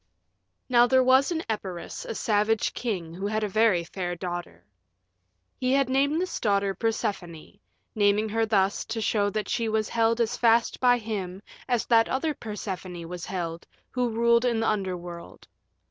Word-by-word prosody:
Now 245 -1 +5
there 260 0 +4
was 260 +4 +4
in 325 -1 -1
Epirus 190 -5 -5
a - - -5
savage 215 +1 +1
king 185 -9 -3
who 190 +4 -4
had 215 +1 -1
a - - +1
very 205 -3 +3
fair 175 +1 -4
daughter. 175 - -6 0.9
He 255 +1 +1
had 275 -2 +2
named 280 +4 +2
this 370 +1 -3
daughter 200 -2 +1
Persephone, 190 -6 -3 0.3
naming 205 +1 +2
her 225 +1 0
thus 200 -2 +1
to 225 0 -4
show 205 -2 +1
that 215 0 -3
she 230 -2 -1
was 215 -1 0
held 230 0 +2
as 230 -1 +1
fast 230 0 +3
by 245 -1 +4
him 200 -4 -5 0.2
as 245 -3 +1
that 230 -1 +4
other 300 +4 0
Persephone 190 - -6
was 175 -1 -7
held 170 -3 -4 0.2
who 250 -1 0
ruled 235 +1 +3
in 240 -3 +1
the 225 - +1
Underworld. 180 -4 -4
215 Hz, 165 wpm, -26 LUFS, 185-235 Hz, 0.9 s, Now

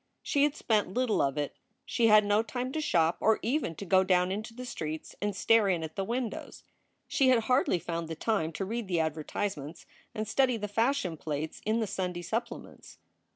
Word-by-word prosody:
She 285 - +1
had 295 0 -1
spent 210 -8 +1
little 250 -3 +2
of 135 +1 0
it. 145 -1 -2 0.3
She 235 -2 +2
had 215 -1 +7
no 205 +1 +3
time 245 +3 -4
to 315 - -2
shop 170 - +2
or 220 0 +3
even 245 - 0
to 200 - -7
go 190 +1 +4
down 180 -1 +2
into 215 +4 -4
the 250 +2 -8
streets 155 -9 -5
and 205 -1 -1
stare 225 0 +4
in 175 -3 0
at 160 0 -6
the 195 - -1
windows. 235 +2 -4 0.4
She 275 -5 +3
had 250 -3 +5
hardly 250 -6 +2
found 170 -1 -4
the 160 - -5
time 165 -3 0
to 195 - -3
read 230 +1 -3
the 175 -3 0
advertisements 160 0 -3 0.3
and 215 -1 -3
study 255 +1 +2
the 210 -1 -4
fashion 225 - 0
plates 155 0 -4
in 225 +2 +2
the - - +1
Sunday 180 -3 -3
supplements. 230 +6 -5
205 Hz, 200 wpm, -30 LUFS, 170-235 Hz, 0.4 s, had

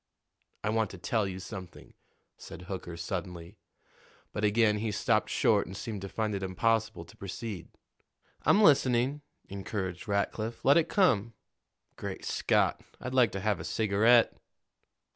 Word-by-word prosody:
"I 105 - 0
want 110 -2 +1
to 95 - -9
tell 105 +3 0
you 95 -1 -5
something," 95 -2 -9 0.4
said 90 - -10
Hooker 90 -2 -6
suddenly; 90 +2 -6 0.7
but 105 - -3
again 105 0 +3
he 110 +1 -1
stopped 100 - +1
short - - +2
and 95 +2 -8
seemed 105 -3 -5
to 95 - -6
find 110 0 -2
it 100 - -3
impossible 95 -1 0
to - - -16
proceed. 100 -1 -6 0.7
"I'm 210 - +4
listening," 135 -3 +4 0.3
encouraged 95 -2 -5
Rackliff. 110 +3 -2
"Let 140 +3 +6
it 170 0 +2
come. 115 - +2 0.6
Great - - -6
Scott! - - +1 0.2
I'd 130 - -5
like 125 -4 +4
to 95 - -3
have 105 0 0
a - - -6
cigarette." 110 +3 +3
105 Hz, 145 wpm, -30 LUFS, 95-115 Hz, 0.7 s, Let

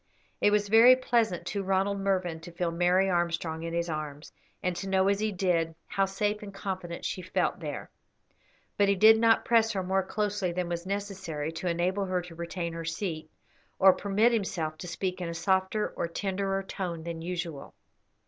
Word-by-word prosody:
It - - +4
was 205 0 +2
very 230 +4 +8
pleasant 235 -8 0
to 200 - -2
Ronald 195 +1 0
Mervyn 185 -4 0
to 170 +2 -10
feel 170 0 -2
Mary 180 +3 +3
Armstrong 170 -2 -1
in 165 0 -4
his 170 0 -1
arms, 155 -2 -5 0.3
and 180 -1 0
to 195 +2 -4
know, 190 0 +3
as 200 0 +1
he 215 0 0
did, 175 -4 0
how 195 - +1
safe 205 +2 -1
and 205 -1 -8
confident 185 -3 -5
she 185 - -3
felt 180 - -1
there; - - -6 0.9
but 200 -1 +4
he 200 - +4
did 220 +3 +7
not 225 0 +4
press 225 -1 +3
her 190 -2 -1
more 190 +1 +1
closely 205 -1 -1
than 180 0 -2
was 170 +1 -4
necessary 190 -6 -3
to 165 +3 -5
enable 180 +3 0
her 185 -1 -1
to 175 -1 -11
retain 170 0 -4
her 165 0 -5
seat, 165 -1 -4 0.5
or 190 0 +7
permit 205 +5 +2
himself 190 -8 -1
to 180 - -7
speak 185 +2 -3
in 175 - -3
a 170 - -5
softer 190 +4 +1
or - - -3
tenderer 195 +2 -2
tone 175 -4 -5
than 165 -1 -5
usual. 165 -4 -5
185 Hz, 190 wpm, -29 LUFS, 170-200 Hz, 0.9 s, very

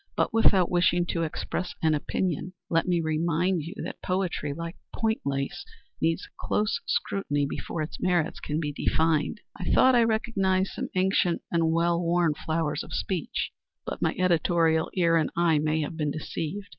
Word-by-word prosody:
But - - +1
without 200 -5 +4
wishing 175 0 +3
to 170 - 0
express 170 +2 -3
an 160 -1 +4
opinion, 175 +3 -2 0.2
let 165 +1 +2
me 175 -1 +2
remind 165 +3 +1
you 165 +6 -7
that - - -7
poetry, 180 -6 -1
like 165 +3 -5 0.2
point 220 -1 0
lace, 140 0 -2 0.4
needs 165 +1 0
close 210 0 0
scrutiny 145 -8 0
before 155 +3 -4
its 155 - -7
merits 175 -3 +1
can 150 +1 -2
be 150 -3 -2
defined. 160 +7 +1
I 180 - -6
thought 260 - +6
I 240 -1 +5
recognized 195 -4 +1
some - - -4
ancient 185 -2 +2
and 165 -1 +2
well 170 +1 +2
worn 170 -2 +2
flowers 155 0 -2
of - - -9
speech, 180 -6 -2 0.3
but - - -5
my - - +1
editorial 165 -2 +2
ear 170 -3 +4
and 155 - +1
eye 165 -3 +4
may 155 +1 +1
have 150 +2 -4
been 150 -2 0
deceived. 160 +6 -4
170 Hz, 170 wpm, -27 LUFS, 155-185 Hz, 0.4 s, thought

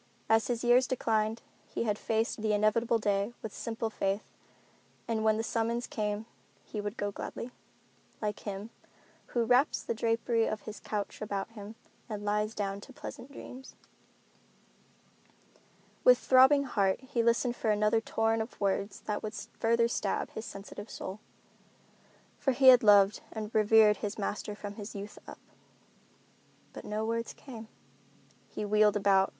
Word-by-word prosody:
As 225 0 +3
his 240 -1 -2
years 245 +1 +5
declined 225 -3 0 0.2
he - - -3
had 210 -2 -1
faced 225 0 -1
the 215 -1 +1
inevitable 215 +3 +2
day 205 +1 0
with 220 - -5
simple 225 -1 -3
faith 195 0 -1 0.8
that 230 -1 -1
when 220 0 +2
the 225 - -1
summons 230 +2 -1
came 210 0 -3 0.4
he 210 - -5
would 205 +2 -5
go 205 0 -1
gladly, 235 +4 -6 0.7
like 210 -1 -2
him 205 +2 -6 0.6
"who 235 -2 0
wraps 250 +5 +3
the - - -2
drapery 230 0 +1
of 215 - -3
his 215 -1 -8
couch 205 -2 -4
about 200 -1 -3
him 215 -1 -10 0.3
and 210 -1 -5
lies 210 +1 0
down 200 -1 -3
to 265 - -12
pleasant 265 +1 -9
dreams." 265 -1 -10 2.3
With - - +8
throbbing 265 +2 +6
heart 200 -7 +1
he 260 -2 -1
listened 235 +1 +2
for 220 - -1
another 210 +1 +3
torrent 225 0 +1
of 220 - -7
words 200 0 -1
that 210 -1 -3
would 215 0 -5
still - - -8
further 230 +1 +3
stab 210 -4 -2
his 220 - -6
sensitive 205 +2 -9
soul; 190 +3 -6 1.2
for 270 - +1
he 260 +1 +7
had 250 -1 +9
loved 205 -1 +6
and 215 -1 -6
revered 215 -1 +5
his 205 +1 -4
master 210 0 -3
from 205 0 -8
his 210 0 -7
youth 200 +1 -7
up. - - -9 1.4
But - - -9
no 215 +1 -2
words 230 +1 -2
came. 230 -5 -10 0.8
He 210 - -4
wheeled 210 0 +4
about. 195 -1 +4
220 Hz, 155 wpm, -30 LUFS, 205-230 Hz, 2.3 s, had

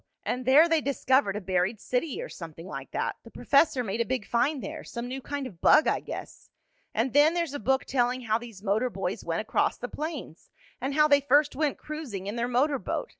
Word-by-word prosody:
And 250 0 -3
there 295 +6 +7
they 325 -2 +2
discovered 260 -6 +1
a 210 - -3
buried 185 +3 0
city, 250 +5 -2
or - - -6
something 165 -1 -9
like 190 - -7
that. - - -2
The - - -12
professor 275 -3 +2
made 220 +1 -2
a - - +4
big 250 -3 -2
find 260 +3 0
there 315 +1 -6
some 235 0 -6
new 265 +2 -5
kind 285 +1 -4
of 190 -10 -10
bug 310 - +6
I - - +2
guess. - - -9 0.4
And 235 +3 -1
then 295 +4 +5
there's 335 -5 -1
a 285 - -4
book 265 +5 +1
telling 250 -1 0
how 220 -2 0
these 230 -5 -11
motor 220 +5 +1
boys - - -4
went - - -1
across - - 0
the - - -5
plains, 300 - -6 0.3
and 270 +2 -2
how 300 0 +5
they 285 -1 +5
first 285 +2 +3
went 295 0 0
cruising 285 -12 -6
in 205 +3 -4
their 235 0 -1
motor 265 +3 +1
boat. - - -3
255 Hz, 225 wpm, -27 LUFS, 225-290 Hz, 0.4 s, there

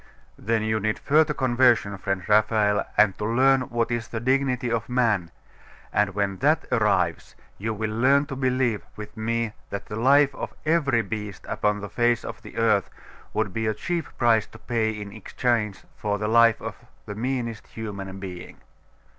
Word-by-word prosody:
'Then 110 +1 -1
you 110 0 0
need 110 +1 -1
a - - -18
further 155 +2 +3
conversion, 120 -5 +3
friend 95 -2 -3
Raphael, 105 -1 +3
and 105 -2 +5
to - - -3
learn 130 +3 +3
what 120 0 -1
is 120 -2 -2
the 115 - -4
dignity 130 -1 +1
of 115 +2 -2
man; 115 -9 +1 0.6
and 105 -2 +1
when 100 -2 -1
that - - +2
arrives, - - +1 0.2
you 110 +3 -2
will 110 0 -3
learn 135 +6 +3
to 140 -2 -6
believe, 130 -4 0
with 105 -1 -9
me, 115 0 -1 0.2
that 100 - -5
the 105 - -7
life 140 +4 +4
of - - -6
every 140 -8 +2
beast 105 -1 -6
upon 105 0 0
the 105 - -5
face 120 +2 +1
of - - -7
the - - -12
earth 110 -4 +2 0.5
would 95 - 0
be 110 -1 -1
a 110 - 0
cheap 170 +6 -3
price 115 -3 +3
to - - -14
pay 115 -3 -1
in 105 -2 -6
exchange 110 0 -2
for 105 -1 -2
the 105 +1 -2
life 115 0 +5
of - - -6 0.3
the 105 - -6
meanest 115 -1 -3
human 100 -3 -7
being. 90 -2 -8
110 Hz, 180 wpm, -25 LUFS, 105-125 Hz, 0.6 s, and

